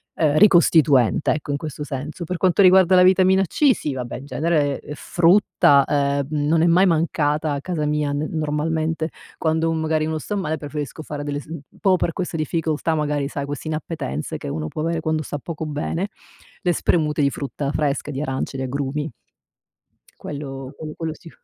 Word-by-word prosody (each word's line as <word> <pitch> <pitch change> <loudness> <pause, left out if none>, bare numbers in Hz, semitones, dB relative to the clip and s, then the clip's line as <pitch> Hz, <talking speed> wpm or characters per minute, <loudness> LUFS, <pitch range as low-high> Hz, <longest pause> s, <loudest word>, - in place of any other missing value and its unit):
uhm, 155 -2 +2
ricostituente 155 - +5
ecco 150 -1 -3
in 140 - 0
questo 150 -1 -6
senso. 150 +4 -5
Per 175 +1 -3
quanto 185 +2 +3
riguarda 185 -1 +6
la 180 - +7
vitamina 190 +1 +5
C, 280 - +3
sì 150 - -4
vabbè 125 -2 -5
in 135 - -10
genere, 145 0 0
ehm, 150 - -8
frutta, 170 -5 +4
uhm, 140 -1 +1 0.2
non 160 +1 +3
è 170 - +4
mai 175 +3 +5
mancata 155 -3 +1
a 140 - -3
casa 160 -2 -2
mia 150 -1 0
n 145 +2 -2
normalmente, 160 +1 -1 0.3
quando, 160 0 +1
un 165 - 0
magari 155 0 0
uno 160 0 -2
sta 210 - -4
male 160 -5 -2
preferisco 150 +1 -6
fare 145 -1 -5
delle 145 0 -3
s - - -17 0.3
proprio 190 -2 +4
per 170 - -1
queste 175 -3 -3
difficoltà 160 +1 -1
magari 150 -2 -1
sai 140 0 -4
queste 145 +2 -6
inappetenze 155 - -4
che - - -8
uno 75 +2 -3
può 155 - -5
avere 165 0 -1
quando 155 0 0
sta 145 - -5
poco 160 +1 -6
bene, 155 +5 -2 0.5
le 180 -3 +1
spremute 150 -2 +1
di 140 - +3
frutta 140 0 -4
fresca, 150 -1 -1
di 135 0 -4
arance, 135 -1 -3
di 130 - -3
agrumi. 140 +3 -3 1.1
Quello 135 -2 -7
quello 155 -1 -7
quello 160 -1 -4
sì. 165 - -14
155 Hz, 190 wpm, -22 LUFS, 145-165 Hz, 1.1 s, la